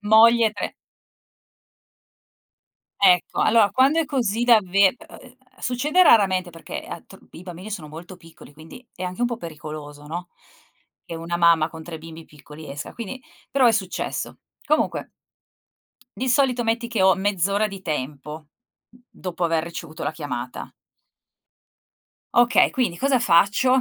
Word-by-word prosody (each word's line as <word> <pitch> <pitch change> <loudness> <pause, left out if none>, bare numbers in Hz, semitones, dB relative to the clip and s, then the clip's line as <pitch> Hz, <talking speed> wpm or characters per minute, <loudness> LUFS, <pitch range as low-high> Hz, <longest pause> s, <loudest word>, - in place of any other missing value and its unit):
Moglie 225 +2 +6
e - - -13
tre 205 - -5 2.3
Ecco, 180 -3 +3
allora 220 -3 +4
quando 275 +5 +3
è 325 - 0
così 240 -6 -1
davve 200 -5 +5
e 215 - -3
e - - -14 0.2
ehm, 250 -1 -16 0.2
succede 290 +8 +1
raramente 190 - +4
perché 165 -1 -8
a - - -7
t - - -15 0.2
i 165 - -11
bambini 180 +3 -9
sono 175 -8 -6
molto 175 +4 -11
piccoli 165 -3 -16
quindi 160 +11 -13
è 185 - -6
anche 180 +4 -5
un 245 - +3
po' 235 -2 -4
pericoloso, 150 -4 -9
no, 175 +3 -6 0.8
che - - -8
una 170 +1 -4
mamma 165 -2 +4
con 160 -1 -10
3 165 0 -7
bimbi 165 0 -11
piccoli 150 +1 -13
esca, 140 +1 -7
quindi 240 +3 -7 0.3
però 265 -3 +4
è - - +5
successo. 200 -4 -3 0.3
Comunque 305 +1 0 1.1
di 255 0 -1
solito 250 -2 +2
metti 230 +1 -1
che 225 -5 0
ho 190 0 +6
mezz'ora 200 +1 0
di 195 -2 -10
tempo, 150 -2 -4
mhmm, 155 - -7 0.5
mhmm, 245 +1 -23
dopo 180 -1 -6
aver 165 -1 +1
ricevuto 160 -2 -8
la - - -1
chiamata. 130 -6 -6 1.7
Okay, 240 +1 +4
quindi 235 -10 -1
cosa 270 +2 +2
faccio? 225 +6 +3
190 Hz, 155 wpm, -23 LUFS, 165-235 Hz, 2.3 s, Moglie